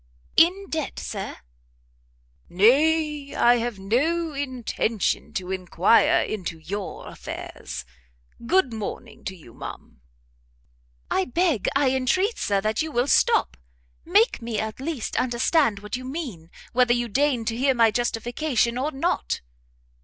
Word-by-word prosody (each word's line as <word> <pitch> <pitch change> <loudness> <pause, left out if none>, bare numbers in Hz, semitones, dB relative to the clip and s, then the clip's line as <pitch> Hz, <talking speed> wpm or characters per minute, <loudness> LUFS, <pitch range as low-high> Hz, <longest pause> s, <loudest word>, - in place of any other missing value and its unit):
"In 370 +4 +4
debt, 315 -3 -3
Sir?" - - -5 1.1
"Nay, 295 - +3
I 240 0 +5
have 235 -2 -3
no 300 - 0
intention 250 -7 -1
to 185 -4 -3
inquire 185 +3 +3
into 185 -6 -4
your 190 +5 -6
affairs. - - -7 0.6
Good 340 -8 +3
morning 225 +1 -6
to 190 - -4
you, 150 -10 -15
ma'am." - - -10 1.1
"I 190 - +2
beg, 300 - +1
I 275 -2 +3
entreat, 370 - +1
Sir, 200 -1 +1
that 215 +1 0
you 315 0 -3
will 245 -2 +1
stop! 65 - +3 0.5
make 410 - +3
me, 230 -1 -3
at 220 +2 -4
least, 275 -3 -3
understand 250 0 +2
what 210 +4 -5
you 255 - -6
mean, 255 - -6 0.2
whether 245 -1 +4
you 240 0 -1
deign 255 0 +1
to 225 - -1
hear 265 +2 +2
my 230 -2 +5
justification 240 +2 0
or 290 +4 -1
not." 320 +6 -1
245 Hz, 130 wpm, -24 LUFS, 215-295 Hz, 1.1 s, I